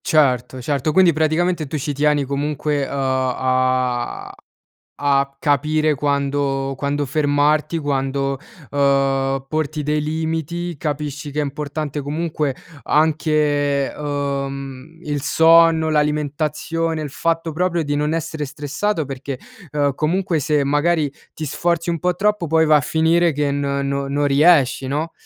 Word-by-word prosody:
Certo, 130 -5 +1
certo, 145 +2 0
quindi 180 -1 +5
praticamente 160 +1 +1
tu 155 - -4
ci 145 0 -2
tieni 145 0 +2
comunque, 145 +1 -1
uhm, - - -9
a 130 -2 0 0.7
a 140 -1 +1
capire 150 +1 +1
quando 140 -1 -1
quando 145 +2 -1
fermarti, 145 +2 +1
quando, 135 -2 -1 0.3
uhm, 135 -1 +1
porti 155 0 -2
dei 150 +1 0
limiti, 160 +2 -3
capisci 145 -1 -4
che 150 - -2
è - - +1
importante 145 +1 -4
comunque 150 -1 -2 0.3
anche, 150 -2 +1
uhm, 140 0 -4
il 145 -3 -2
sonno, 160 0 +5
l'alimentazione, 150 +2 -1
il 145 - -5
fatto 165 +2 -1
proprio 175 0 0
di 145 0 -1
non 150 +2 0
essere 160 -2 -3
stressato, 150 +5 -2
perché, 135 0 -6 0.3
ehm, 145 -2 0
comunque, 170 +2 0
se 150 0 +1
magari 145 +1 +1 0.2
ti 155 - -5
sforzi 170 +3 -1
un 170 - -1
po' 180 +2 +1
troppo, 210 -3 +1
poi 160 +1 +3
va 155 - +6
a 150 - +4
finire 165 +3 +2
che 145 0 0
n 145 - -1 0.2
no 140 0 -2
non 145 +1 0
riesci, 140 -2 +4
no, 150 +4 -2
150 Hz, 135 wpm, -20 LUFS, 140-160 Hz, 0.7 s, va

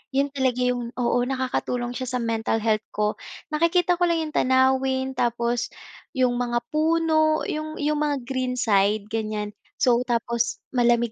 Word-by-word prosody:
Yun 280 +1 +2
talaga 260 -3 0
yung 245 -1 -1
oo, 245 -1 +1
nakakatulong 250 -2 -2
siya 255 +1 -4
sa - - 0
mental 225 -1 -1
health 215 -1 +1
ko. 210 0 0 0.3
Nakikita 340 +3 +2
ko 355 - +3
lang 335 -1 +1
yung - - -23
tanawin 260 0 +2
tapos 235 0 0 0.5
yung 250 -2 +2
mga 240 -1 -1
puno, 315 0 +2
yung 310 0 -4
yung 300 0 +1
mga 290 -3 0
green 255 0 -2
side, 205 -3 +2
ganiyan. 215 -2 -2 0.3
So, 240 -2 +5
tapos 235 0 -1
malamig 240 -2 +2
250 Hz, 150 wpm, -24 LUFS, 235-285 Hz, 0.5 s, So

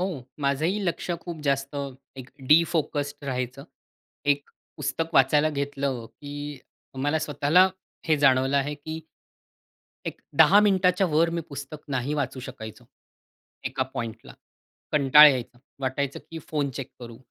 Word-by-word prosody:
हो. 180 -9 -3 0.2
माझंही 150 +8 +1
लक्ष 175 0 -2
खूप 165 -2 -7
जास्त 140 0 -1
अ, 140 -1 -3 0.3
एक 130 0 -9 0.2
डिफोकस्ड 150 -3 +2
राहायचं. 130 0 -3 0.6
एक 145 0 +1 0.3
पुस्तक 155 +3 -2
वाचायला 145 +3 +4
घेतलं 140 -4 -3
की 145 +1 -8 0.4
मला 145 +2 +1
स्वतःला 155 +4 +3 0.4
हे 155 -1 +4
जाणवलं 135 0 +4
आहे 145 +2 0
की 155 +2 -7 1.1
एक - - -6 0.2
10:00 205 +2 +8
मिनिटाच्यावर 180 -5 +3
मी - - -1
पुस्तक 140 +1 -7
नाही 135 +1 -1
वाचू 140 -3 -2
शकायचो. 125 -4 -9 0.8
एका 130 - -1
पॉइंटला 115 -1 -6 0.6
कंटाळा 150 +1 +8
यायचा. 125 -2 -3 0.2
वाटायचं 135 +1 -2
की 165 - -5
फोन 145 -3 0
चेक 130 +1 -6
करू. 115 -1 -9
145 Hz, 130 wpm, -26 LUFS, 135-155 Hz, 1.1 s, 10:00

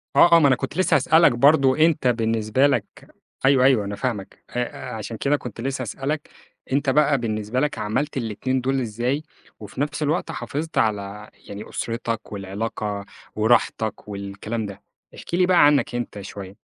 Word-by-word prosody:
آه، 170 - +7
آه. - - +7
ما 150 - +5
أنا 130 - +4
كنت 145 - -5
لسّه 185 - +3
هسألك 165 +1 +5
برضه، 135 +2 +4
أنت 155 -4 +3
بالنسبة 115 +2 +2
لك 140 - +1 0.6
أيوه، 135 -1 +5
أيوه، 130 -6 +4
أنا 100 +1 -4
فاهمَك. 105 -3 -4
آآ 125 0 -4
عشان 110 +1 -6
كده 140 +5 +1
كنت 120 -4 -8
لسّه 135 +1 -2
هسألك 135 +5 -4 0.4
أنت 140 +1 +1
بقى 145 +1 +3
بالنسبة 110 0 -2
لك 150 +2 -1
عملت 125 +8 -2
الاتنين 130 +2 -2
دول 135 +1 0
إزاي 120 +6 -2 0.4
وفي 105 +5 -7
نفس 145 +1 -2
الوقت 155 +4 -1
حافظت 160 +3 -5
على 105 -1 -1 0.2
يعني 100 +1 -8
أُسرتك 115 -1 -4
والعلاقة 100 +1 -4 0.3
وراحتك 110 -1 +1
والكلام 100 +2 -5
ده، 100 -1 -9 0.3
احكِ - - -11
لي 180 +1 +4
بقى 180 -4 +5
عنّك 145 -4 +3
أنت 120 -4 -4
شوية؟ 100 0 -9
120 Hz, 165 wpm, -23 LUFS, 105-140 Hz, 0.6 s, آه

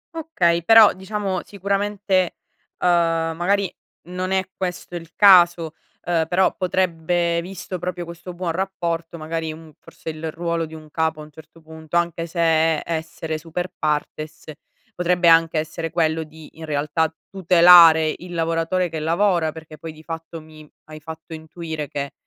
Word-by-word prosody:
Okay, 180 - 0
però 225 +2 +7
diciamo, 190 -1 -3
sicuramente, 200 -1 -1 0.5
uhm, - - +2 0.5
magari 195 +2 0 0.4
non 185 +1 -3
è 190 -1 0
questo 180 -1 -5
il 165 -1 -8
caso, 175 -5 +6 0.3
uhm, 165 -2 0
però 185 +2 +2
potrebbe 175 -2 0
visto 185 0 -7
proprio 180 0 -4
questo 170 +1 -9
buon 175 -1 -2
rapporto, 170 -2 -3
magari, 160 0 -4
un 155 -1 -12
forse - - -10
il 155 +1 -6
ruolo 170 0 -2
di 160 - -11
un 155 -1 -13
capo, 160 -1 -1
a - - -7
un 150 - -14
certo 160 +2 -16
punto, 160 +1 -5
anche 170 -1 -1
se 170 +1 -7
è 160 -1 +2
essere 160 -1 -4
super 170 +3 -5
partes, 155 +1 -3 0.4
potrebbe 180 -1 +2
anche 165 -1 +4
essere 165 +1 -3
quello 160 -1 0
di, 160 0 -13
in 160 - -7
realtà, 150 +2 -1 0.2
tutelare 170 -3 +6
il 175 0 -10
lavoratore 165 +2 0
che 160 -1 -5
lavora, 170 0 +1
perché 155 -1 -12
poi, 165 - -7
di 155 - -16
fatto, 165 0 -7
mi 155 -1 -16 0.2
hai 155 0 -9
fatto 160 +2 -10
intuire 160 -1 -6
che, 140 0 -5
165 Hz, 155 wpm, -22 LUFS, 160-180 Hz, 0.5 s, però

